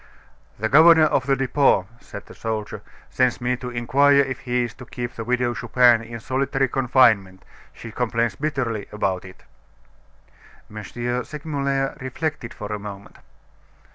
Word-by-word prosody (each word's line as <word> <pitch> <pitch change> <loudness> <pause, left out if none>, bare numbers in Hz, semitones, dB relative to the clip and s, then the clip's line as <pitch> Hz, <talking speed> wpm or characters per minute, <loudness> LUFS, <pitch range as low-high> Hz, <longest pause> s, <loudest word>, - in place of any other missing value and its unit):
"The 110 - -1
governor 160 +5 +7
of 140 -3 +1
the 135 - +3
Depot," 135 -6 +2
said - - -10
the - - -13
soldier, 110 -2 -5 0.3
"sends 125 -2 +1
me 125 0 0
to 125 0 -6
inquire 140 +4 +3
if 130 -3 -3
he 125 0 -1
is 120 - -5
to - - -8
keep 120 0 -6
the 115 - -6
Widow 125 +1 0
Chupin 120 -2 +3
in 115 0 -8
solitary 135 +2 -1
confinement; 120 -8 +2 0.3
she 115 - -10
complains 115 -1 -1
bitterly 125 -5 -3
about 95 -3 -2
it." 95 - -14 1.3
M. 105 - -6 0.4
Segmuller 140 -3 -3
reflected 130 -1 -4
for 105 0 -7
a 105 - -4
moment. 100 -1 -10
125 Hz, 145 wpm, -22 LUFS, 110-135 Hz, 1.3 s, governor